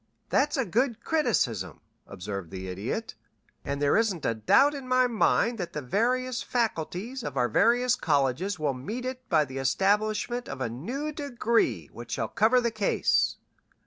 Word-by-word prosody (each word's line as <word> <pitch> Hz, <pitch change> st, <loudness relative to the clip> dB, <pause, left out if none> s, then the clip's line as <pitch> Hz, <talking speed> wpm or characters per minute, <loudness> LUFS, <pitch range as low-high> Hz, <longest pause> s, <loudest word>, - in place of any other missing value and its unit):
"That's 295 Hz, +2 st, +2 dB
a 265 Hz, -, +1 dB
good 235 Hz, +4 st, 0 dB
criticism," 210 Hz, -, 0 dB, 0.3 s
observed 95 Hz, -1 st, -6 dB
the 95 Hz, +1 st, -7 dB
Idiot, 110 Hz, -, -4 dB, 0.5 s
"and 140 Hz, 0 st, -3 dB
there 145 Hz, 0 st, +3 dB
isn't 210 Hz, -8 st, +1 dB
a 115 Hz, -, +2 dB
doubt 115 Hz, -, +4 dB
in 275 Hz, -3 st, -7 dB
my 255 Hz, 0 st, +4 dB
mind 230 Hz, 0 st, +2 dB
that 175 Hz, -, -4 dB
the 150 Hz, -, -3 dB
various 245 Hz, -, 0 dB
faculties 230 Hz, +2 st, -2 dB
of 140 Hz, -2 st, -5 dB
our 125 Hz, -1 st, +3 dB
various 245 Hz, -, +3 dB
colleges 155 Hz, -, 0 dB
will 150 Hz, -3 st, 0 dB
meet 210 Hz, -, -5 dB
it 255 Hz, 0 st, -6 dB
by 155 Hz, -4 st, +4 dB
the 135 Hz, 0 st, -6 dB
establishment 210 Hz, -, 0 dB
of 135 Hz, -, -6 dB
a 130 Hz, -, -1 dB
new 245 Hz, -, -4 dB
degree 240 Hz, -6 st, 0 dB
which -, -, -8 dB
shall -, -, -2 dB
cover 230 Hz, +4 st, +3 dB
the 235 Hz, -1 st, 0 dB
case." 215 Hz, -2 st, +1 dB
215 Hz, 165 wpm, -27 LUFS, -, 0.5 s, doubt